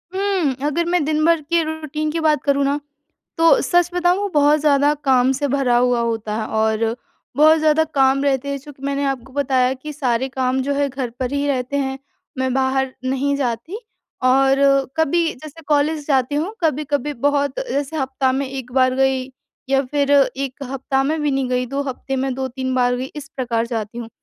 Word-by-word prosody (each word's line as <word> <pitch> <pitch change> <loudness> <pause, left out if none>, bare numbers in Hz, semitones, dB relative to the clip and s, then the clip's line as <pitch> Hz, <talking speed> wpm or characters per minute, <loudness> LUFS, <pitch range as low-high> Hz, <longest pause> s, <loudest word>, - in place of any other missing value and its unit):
हुँ, 380 -8 +1
अगर 320 +3 0
मैं 355 -3 +2
दिनभर 310 +2 +2
के 335 +3 +1
रूटीन 310 -1 -3
की 330 - -2
बात 310 -2 +2
करूँ 280 -1 +2
ना 285 +1 0 0.6
तो 330 0 +5
सच 350 0 +2
बताऊँ 355 +1 +2
वो 405 - -1
बहुत 295 +1 +4
ज़्यादा 290 -1 +3
काम 260 -1 +4
से 285 +2 -1
भरा 265 -3 +2
हुआ 245 0 +2
होता 225 -2 -2
है 215 - -3
और 220 +1 0 0.4
बहुत 310 +2 +6
ज़्यादा 310 0 +3
काम 270 0 +3
रहते 275 -1 0
हैं। 280 0 -2
चूँकि 275 -1 -14
मैंने 280 0 -1
आपको 265 -2 -3
बताया 260 -2 +1
कि 300 +4 -8
सारे 260 -3 -1
काम 260 0 -1
जो 280 +1 -1
है 285 0 +1
घर 260 -2 -4
पर 255 0 -2
ही 285 0 0
रहते 260 0 -1
हैं, 270 -1 -2 0.4
मैं 260 0 0
बाहर 265 0 0
नहीं 270 +2 0
जाती 265 - -3 0.4
और 270 +1 +4 0.4
कभी 325 +2 +2
जैसे 310 +3 -12
कॉलेज 300 0 +1
जाती 270 -1 +1
हूँ। 335 +9 -2
कभी-कभी 295 -1 0
बहुत 285 -1 0
जैसे 285 +3 -2
हफ़्ता 265 -1 0
में 270 +1 -1
1 260 -2 -7
बार 255 0 +3
गई 265 0 0 0.4
या 270 0 +3
फिर 285 -1 0 0.3
1 275 0 -5
हफ़्ता 270 0 -1
में 310 +3 -1
भी 295 - +1
नहीं 270 -2 -1
गई, 250 0 0
2 275 +3 -2
हफ़्ते 270 0 -4
में 265 0 -1
2-3 260 0 -3
बार 245 -1 +2
गई 260 +2 -5
इस 285 -2 -7
प्रकार 235 -3 -1
जाती 225 -1 -4
हूँ। 235 -2 -6
275 Hz, 195 wpm, -20 LUFS, 260-295 Hz, 0.6 s, बहुत